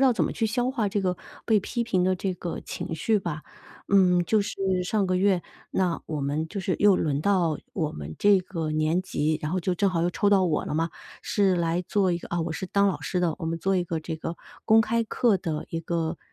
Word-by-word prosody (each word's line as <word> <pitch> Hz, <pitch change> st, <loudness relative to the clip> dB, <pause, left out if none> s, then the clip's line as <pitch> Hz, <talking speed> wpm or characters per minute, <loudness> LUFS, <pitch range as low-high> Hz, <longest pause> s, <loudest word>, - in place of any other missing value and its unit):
道 265 Hz, -2 st, +5 dB
怎 -, -, +1 dB
么 -, -, -2 dB
去 225 Hz, -, -1 dB
消 245 Hz, +3 st, 0 dB
化 235 Hz, -6 st, 0 dB
这 205 Hz, +1 st, -1 dB
个 180 Hz, -1 st, 0 dB, 0.3 s
被 220 Hz, -3 st, +4 dB
批 235 Hz, +4 st, -2 dB
评 185 Hz, -5 st, +1 dB
的 185 Hz, 0 st, +2 dB
这 185 Hz, 0 st, -2 dB
个 175 Hz, -1 st, -5 dB
情 -, -, -6 dB
绪 210 Hz, +7 st, +1 dB
吧。 155 Hz, -4 st, -4 dB, 0.4 s
嗯， 180 Hz, -3 st, +4 dB
就 215 Hz, +2 st, +2 dB
是 205 Hz, -, -5 dB, 0.3 s
上 200 Hz, +2 st, 0 dB
个 185 Hz, 0 st, +1 dB
月， 190 Hz, -1 st, +3 dB, 0.3 s
那 180 Hz, -3 st, 0 dB
我 155 Hz, -2 st, -3 dB
们 145 Hz, +3 st, -1 dB
就 200 Hz, -, -5 dB
是 185 Hz, -1 st, -1 dB
又 205 Hz, -2 st, +6 dB
轮 145 Hz, -2 st, 0 dB
到 175 Hz, -4 st, +2 dB, 0.2 s
我 160 Hz, -5 st, -2 dB
们 75 Hz, +1 st, -7 dB
这 205 Hz, -2 st, +5 dB
个 165 Hz, -4 st, -4 dB
年 155 Hz, +3 st, +1 dB
级， 155 Hz, -4 st, -1 dB
然 150 Hz, +2 st, -3 dB
后 185 Hz, -, 0 dB
就 180 Hz, +1 st, -1 dB
正 200 Hz, +3 st, +3 dB
好 170 Hz, -3 st, 0 dB
又 175 Hz, -, +1 dB
抽 205 Hz, -, +1 dB
到 195 Hz, -2 st, +4 dB
我 165 Hz, -4 st, 0 dB
了 -, -, -4 dB
嘛， 165 Hz, +1 st, 0 dB, 0.3 s
是 195 Hz, -3 st, +2 dB
来 170 Hz, 0 st, 0 dB
做 190 Hz, +1 st, +1 dB
一 170 Hz, -, 0 dB
个 -, -, -10 dB
啊 170 Hz, -, 0 dB
我 165 Hz, +1 st, -2 dB
是 165 Hz, +4 st, -4 dB
当 200 Hz, +2 st, +3 dB
老 190 Hz, -, -2 dB
师 180 Hz, -, -2 dB
的， 170 Hz, -3 st, 0 dB
我 165 Hz, -, -4 dB
们 165 Hz, +1 st, -1 dB
做 195 Hz, +2 st, +1 dB
一 180 Hz, -, +1 dB
个 165 Hz, -2 st, -3 dB
这 160 Hz, 0 st, -5 dB
个 165 Hz, +2 st, -5 dB, 0.3 s
公 225 Hz, 0 st, +6 dB
开 230 Hz, +1 st, +1 dB
课 225 Hz, -1 st, +2 dB
的 160 Hz, -4 st, -3 dB
一 165 Hz, -, -2 dB
个， 165 Hz, -1 st, -2 dB
180 Hz, 270 characters per minute, -26 LUFS, 165-200 Hz, 0.4 s, 又